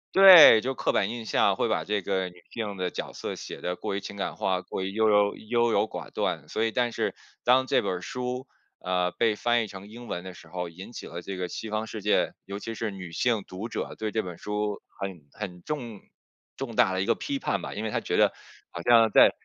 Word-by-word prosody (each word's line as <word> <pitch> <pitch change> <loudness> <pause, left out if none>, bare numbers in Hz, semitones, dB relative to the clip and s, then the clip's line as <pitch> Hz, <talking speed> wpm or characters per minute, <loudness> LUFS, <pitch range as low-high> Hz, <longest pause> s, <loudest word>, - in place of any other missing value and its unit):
对， 185 - +11
就 130 +3 -2
刻 - - 0
板 100 +1 +1
印 120 -1 -5
象， - - +2
会 - - 0
把 - - 0
这 105 -1 -1
个 95 -1 -1
女 90 0 -19
性 105 -4 -4
的 90 -1 -1
角 - - -6
色 - - -5
写 - - -8
得 90 - -2
过 95 - -4
于 100 - -1
情 100 - -8
感 100 - -3
化， 95 -1 0
过 95 - -5
于 95 - -2
优 110 +1 +2
柔 105 -1 +4
优 120 +1 +1
柔 100 - +3
寡 90 -7 -7
断。 - - -2
所 110 - -1
以 110 - 0
但 120 0 +1
是 - - -1 0.3
当 130 +1 +4
这 - - +2
本 - - -1
儿 90 0 -3
书， 125 +5 -4 0.3
呃， 90 -1 0
被 115 -3 +1
翻 120 +1 +2
译 - - -5
成 95 +1 -10
英 120 +3 -11
文 90 - -4
的 95 - -8
时 85 - -14
候， 90 +1 -4
引 90 +7 -10
起 - - -7
了 85 +1 -7
这 95 +1 -6
个 90 - -2
西 110 - -6
方 110 +1 -2
世 110 -1 -7
界， 105 - +2
尤 100 +1 -5
其 115 +2 -6
是 110 0 -3
女 95 -4 -8
性 115 +3 +1
读 95 +5 -6
者 - - -4
对 110 -1 -1
这 110 - 0
本 90 -2 -8
书 105 0 -2 0.2
很 90 -7 -6
很 90 -4 -7
重 120 -8 -5 0.6
重 125 -4 -5
大 95 - +4
的 95 0 0
一 - - -3
个 - - +3
批 280 -1 -3
判 - - -1
吧。 - - -6
因 105 - -4
为 110 - -2
她 - - 0
觉 - - -2
得 - - +4 0.4
好 85 - -6
像 115 +1 +5
在 - - +7
105 Hz, 270 characters per minute, -27 LUFS, 95-115 Hz, 0.6 s, 对